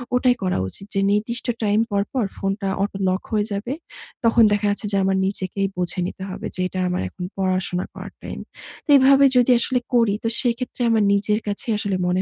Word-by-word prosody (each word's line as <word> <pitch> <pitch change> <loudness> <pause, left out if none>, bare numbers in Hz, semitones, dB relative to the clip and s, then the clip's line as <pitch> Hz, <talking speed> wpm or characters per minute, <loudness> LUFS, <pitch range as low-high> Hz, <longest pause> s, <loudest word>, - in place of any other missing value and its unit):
ওটাই 250 0 +3
করা 185 - 0
উচিত 195 - -6
যে 195 - +2
নির্দিষ্ট 220 +4 -1 0.2
টাইম 210 0 +2
পর, 200 0 +2
পর 255 -5 +1
ফোনটা 195 0 -2
অটো 200 -1 -3
লক 185 +1 0
হয়ে 210 -2 +1
যাবে। 215 +7 -3 0.5
তখন 230 0 +5
দেখা 205 0 0
যাচ্ছে 205 +1 -3
যে, 200 - +1
আমার 190 0 +2
নিজেকেই 195 0 -1
বুঝে 180 0 -1
নিতে 190 - -7
হবে 185 - -6
যে 185 - -2
এটা 185 - -5
আমার 180 - -1
এখন 180 - -9
পড়াশোনা 185 -1 0
করার - - -9
টাইম। - - -6 0.5
তো - - -23
এভাবে 275 +1 +6
যদি 250 +1 +5
আসলে 250 +2 +1 0.2
করি 230 -4 +3
তো - - +2 0.2
সেক্ষেত্রে 245 +1 -3
আমার 220 -2 +3
নিজের 210 +1 +1
কাছেই 215 +3 -2
আসলে 200 -2 -1
মনে 180 +1 +1
205 Hz, 200 wpm, -22 LUFS, 190-230 Hz, 0.5 s, এভাবে